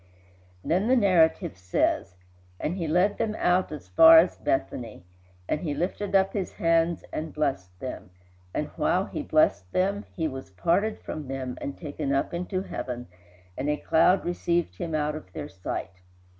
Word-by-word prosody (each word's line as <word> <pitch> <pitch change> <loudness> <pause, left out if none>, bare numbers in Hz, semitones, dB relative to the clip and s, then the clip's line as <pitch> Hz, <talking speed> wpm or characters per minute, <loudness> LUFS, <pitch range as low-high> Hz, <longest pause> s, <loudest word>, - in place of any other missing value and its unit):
Then 185 +6 +1
the 255 - +5
narrative 175 - +3
says: 90 -1 0 0.4
"And 165 - -2
he 170 -4 -3
led 180 +6 +2
them 220 -2 0
out 180 0 +2
as 150 -10 -8
far 160 - +8
as 170 +3 +5
Bethany; 110 -3 -2 0.4
and 150 - -1
he 150 -5 -2
lifted 190 +5 -2
up 190 0 +3
his 195 -3 -3
hands 165 0 +1
and 155 0 -3
blessed 95 -12 -2
them, 130 - -6 0.4
and - - -2
while - - +2
he - - -5
blessed 90 0 +2
them 200 +3 0
he 160 -3 0
was 135 -6 -7
parted 175 - +1
from 150 -3 -6
them 130 -1 -4
and 140 - -5
taken 145 -3 -3
up 135 - -1
into 180 +2 -2
heaven; 125 - -5 0.5
and 140 +3 -2
a 150 - +1
cloud 180 +4 +3
received 175 - -1
him 165 -2 -2
out 150 0 0
of 150 -12 -9
their - - -5
sight. 95 0 -6
160 Hz, 170 wpm, -27 LUFS, 130-180 Hz, 0.5 s, far